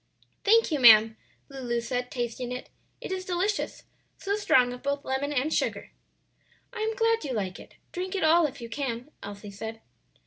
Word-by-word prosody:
"Thank 455 -1 +4
you, 300 - +1
ma'am," 225 -2 +8 0.3
Lulu 250 -4 -3
said, 245 +1 -3
tasting 240 0 -4
it; 250 - -6 0.3
"it - - -6
is 375 0 -2
delicious, 370 +3 -2 0.3
so 400 +1 -1
strong 255 -12 +3
of 250 - -9
both 280 0 -2
lemon 265 +2 -1
and 290 +2 0
sugar." - - -1 0.8
"I - - -6
am 440 +1 -1
glad 455 0 +2
you 270 - -3
like 195 -5 -3
it; - - -14 0.2
drink 370 +1 -4
it 385 - -1
all 320 +1 +5
if 265 - -11
you 235 - -6
can," 250 +1 -4
Elsie 205 0 -8
said. 220 +3 -7
265 Hz, 180 wpm, -27 LUFS, 235-360 Hz, 0.8 s, ma'am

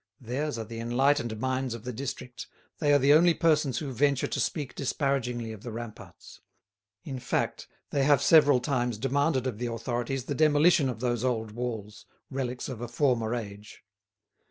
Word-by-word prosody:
Theirs 130 +2 -3
are 115 - -3
the 115 +1 -7
enlightened 120 -1 +1
minds 130 -1 -1
of 115 - -10
the 125 0 -5
district, 125 -1 -6 0.3
they 145 -2 +2
are 145 - +7
the 140 +1 +5
only 170 +2 +5
persons 150 -6 +2
who 140 0 -3
venture 140 +1 +2
to - - -3
speak 145 -5 -2
disparagingly 125 -4 -1
of 110 -2 -9
the 120 - -7
ramparts; 115 -1 -10 0.6
in 135 -3 -5
fact, - - -2 0.2
they 140 - +1
have 140 0 +4
several 145 -5 +6
times 120 -5 -1
demanded 135 +2 +1
of 120 -5 -3
the 120 - -2
authorities 120 +2 -3
the 145 - -2
demolition 155 +1 +4
of 115 -3 -5
those 120 -2 0
old 110 -4 -1
walls, 110 -3 -6 0.2
relics 130 -2 -3
of 125 -4 -6
a 120 - -3
former 120 -2 +1
age. 105 -2 -8
125 Hz, 175 wpm, -28 LUFS, 120-140 Hz, 0.6 s, are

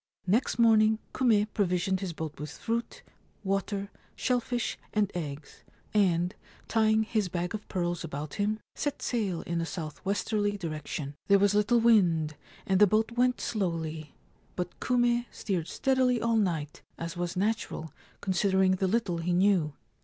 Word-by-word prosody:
' - - -48
Next 215 +8 +1
morning 220 -2 +5 0.2
Kume 225 -5 +3
provisioned 190 -1 +1
his 190 -2 -3
boat 160 -3 -6
with 150 +1 -5
fruit, 230 +1 -3 0.4
water, 195 +1 -2 0.2
shell 250 -1 +1
fish, 240 -2 -2 0.2
and 205 -2 +2
eggs, 150 -4 -6 0.3
and, 180 -3 +2 0.3
tying 220 -1 +3
his 215 -3 -1
bag 175 0 -2
of 215 -1 -6
pearls 175 -2 -2
about 150 -2 -5
him, 215 +1 0
set 290 - -3
sail 200 -8 -1
in 170 0 -2
a - - -1
south 155 -1 -6
westerly 205 +1 0
direction. 155 -4 -4
There 200 - +6
was 200 0 +3
little 210 +3 +3
wind, 175 -10 +4 0.3
and 190 -1 +2
the 210 - +8
boat 220 +4 +2
went 250 +1 +2
slowly; 165 -7 -3 0.4
but 180 -1 -4
Kume 240 -1 +2
steered 180 -6 -3
steadily 255 +2 +2
all 230 0 +1
night, 165 -9 -1 0.2
as 165 +1 -5
was 175 +1 -3
natural, 205 -5 -2 0.3
considering 190 0 +2
the 190 - +1
little 185 -4 0
he 175 +1 0
knew. 180 -5 +3
195 Hz, 155 wpm, -29 LUFS, 170-220 Hz, 0.4 s, the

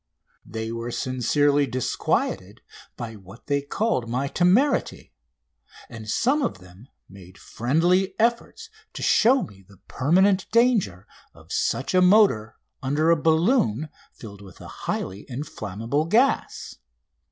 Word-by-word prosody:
They 110 0 -6
were 115 +1 -5
sincerely 140 +4 +1
disquieted 130 -1 -2 0.4
by 115 -1 -6
what 95 +3 -15
they 140 -1 0
called 140 - -2
my 130 +4 -1
temerity, 190 - +1 0.8
and 110 -3 -9
some 265 - +1
of 245 - -2
them 95 +6 -17 0.2
made 95 -2 -15
friendly 175 - 0
efforts 240 - -1 0.2
to - - -6
show 250 +3 +4
me 95 -1 -12
the 100 +1 -20
permanent 190 +7 +2
danger 225 - +1 0.3
of - - -17
such 135 - -1
a 185 - +4
motor 180 - +4 0.3
under 150 +4 +1
a - - +5
balloon 160 - +1 0.2
filled 100 -3 -12
with 95 -3 -14
a - - -11 0.2
highly 95 +2 -3
inflammable 120 0 -4
gas. 235 +10 0
140 Hz, 125 wpm, -24 LUFS, -, 0.8 s, a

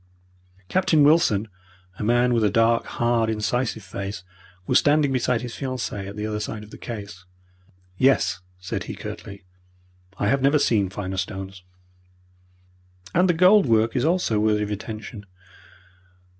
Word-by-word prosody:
Captain 160 - +3
Wilson, 145 -9 +3 0.5
a - - -3
man 120 +2 +3
with 115 -2 +2
a 105 - +4
dark, 115 +3 +2
hard, 120 -1 0
incisive 110 +1 -1
face, 95 0 -6 0.4
was - - +4
standing 145 -1 +3
beside 125 -2 0
his 120 -1 -6
fiancee 125 -7 -4
at 100 - -8
the 105 0 -4
other 105 -1 -3
side 105 0 -5
of 105 - -14
the - - -10
case. 105 -5 -8 0.8
"Yes," 135 -7 +3 0.2
said 90 0 -4
he, - - -6
curtly, 100 -1 -8 0.7
"I 100 - 0
have 135 +5 +2
never 140 +3 +4
seen 110 -9 +2
finer 95 -1 -5
stones." 95 0 -5 1.5
"And 180 +2 +3
the 175 - +3
gold 185 +1 +5
work 115 +1 +2
is 125 - +1
also 160 - +1
worthy 105 0 +2
of 105 - -4
attention. 110 0 -7
110 Hz, 150 wpm, -23 LUFS, 105-130 Hz, 1.5 s, gold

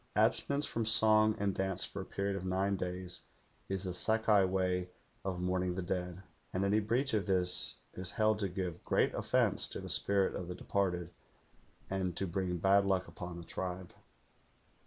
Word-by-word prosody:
Abstenance 140 +1 +2
from 115 -1 -2
song 110 -1 +5
and 100 -2 0
dance 95 -1 -1
for 100 - -6
a - - -7
period 100 0 -2
of 95 - -4
nine 95 +2 +1
days 90 -1 -5 0.4
is 95 -1 -2
the 90 -2 -3
Sakai 110 +1 +3
way 90 -1 0 0.3
of 95 -2 -3
mourning 90 0 0
the 95 - -2
dead, 90 0 -3 0.3
and 95 +2 0
any 105 +2 +3
breach 120 +6 0
of 105 -5 +1
this 90 -2 +2
is 90 -1 -5
held 110 +1 +2
to 100 -2 0
give 90 -2 -4
great - - +2
offence - - +2
to - - -5
the - - -7
spirit 100 -1 +3
of 90 - -4
the 90 - -5
departed 90 -3 -1 0.8
and 95 -3 -2
to 95 - 0
bring 90 0 -2
bad 95 +3 +4
luck 95 -1 +1
upon 90 -1 -7
the 85 - -7
tribe. 90 0 -5
95 Hz, 180 wpm, -33 LUFS, 90-100 Hz, 0.8 s, song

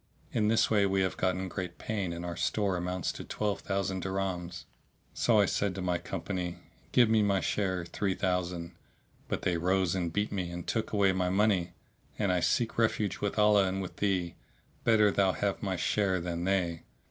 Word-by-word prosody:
In 105 -2 +1
this 110 +1 +3
way 100 -2 +4
we 95 0 +1
have 95 -1 0
gotten 95 0 0
great 90 -1 -5
gain 100 -5 -3
and 85 +1 -5
our 85 -1 -4
store 100 -1 0
amounts 90 0 -2
to - - -8
twelve 105 -2 -2
thousand 95 -1 -2
dirhams. 90 -2 -3 0.5
Said 115 -2 +3
I 105 - +6 0.3
to 95 - -4
my 90 -1 0
company, 90 -3 -4 0.3
'Give 120 -2 +5
me 110 0 +4
my 100 -2 +2
share, 95 -4 -1
three 95 +2 -1
thousand;' 90 -2 -1 0.6
but - - -3
they 90 -2 +1
rose 90 +1 +1
and 90 -3 -1
beat 105 +4 -1
me 95 -4 -2
and 85 0 -6
took 110 - -2
away 100 -2 +3
my 90 -1 0
money, 95 -3 +2 0.4
and 100 -3 +1
I 90 - +2
seek 115 +6 0
refuge 110 -3 +1
with 100 +1 -2
Allah 105 -2 +5
and 95 +1 -2
with 95 -2 -6
thee; 95 -4 0 0.5
better 105 -3 +5
thou 95 -1 +2
have 100 -1 -1
my 95 -2 -1
share 95 +1 +1
than 85 0 -3
they. 90 -4 0
95 Hz, 190 wpm, -30 LUFS, 90-100 Hz, 0.6 s, I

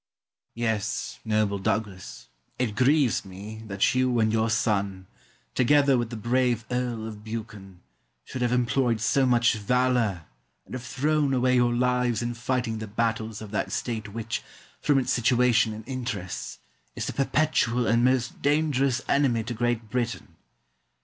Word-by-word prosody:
Yes, 110 -3 -2
noble 105 -2 +1
Douglas, 100 -2 -3 0.3
it 115 -5 -1
grieves 130 +1 +3
me 100 +3 -9
that 100 -1 +1
you 130 -1 +2
and 110 -1 +2
your 110 0 +2
son, 100 -4 0 0.5
together 140 +2 +4
with 120 -2 -1
the 120 - -6
brave 120 0 +1
Earl 125 -3 -2
of 105 -1 -9
Buchan, 105 -4 -8 0.4
should 130 - -6
have 120 -1 +1
employed 125 -1 +1
so 130 +4 +2
much 120 -1 +4
valour 115 -4 +1 0.4
and - - -13
have 130 - -4
thrown 140 +2 0
away 125 0 +2
your 120 -1 +3
lives 125 -2 +1
in 120 0 -2
fighting 120 -1 -2
the 110 - -5
battles 110 0 -2
of 105 - -10
that 105 - -2
State 110 -3 -3
which, 115 +1 -3 0.4
from 145 - +3
its 130 - +1
situation 120 -2 +3
and 110 +1 -8
interests, 120 -8 -4 0.4
is - - -3
the - - -3
perpetual 135 -4 +1
and 115 +1 +3
most 130 -1 +1
dangerous 140 -3 +1
enemy 130 -5 +2
to 120 - -4
Great 120 -1 -1
Britain. 120 -1 -3
120 Hz, 150 wpm, -26 LUFS, 110-125 Hz, 0.5 s, together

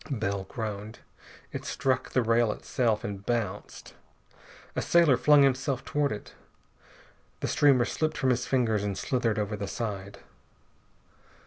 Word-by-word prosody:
Bell 100 -7 -2
groaned. 110 +1 -6 0.5
It - - -5
struck 130 -1 -1
the 125 - +1
rail 115 0 +3
itself, 115 -1 -1
and 100 -1 -5
bounced. 115 -1 -4 0.8
A - - 0
sailor 170 -6 +4
flung 145 +2 +5
himself 135 0 0
toward 145 -1 0
it. 105 - -7 1.1
The - - -1
streamer 135 -4 +4
slipped 155 -1 -2
from 130 - +2
his 125 0 -1
fingers 115 -6 +1
and 100 -2 -2
slithered 115 -4 0
over 105 0 -1
the 100 -1 -4
side. 100 -3 -5
115 Hz, 135 wpm, -28 LUFS, 105-130 Hz, 1.1 s, flung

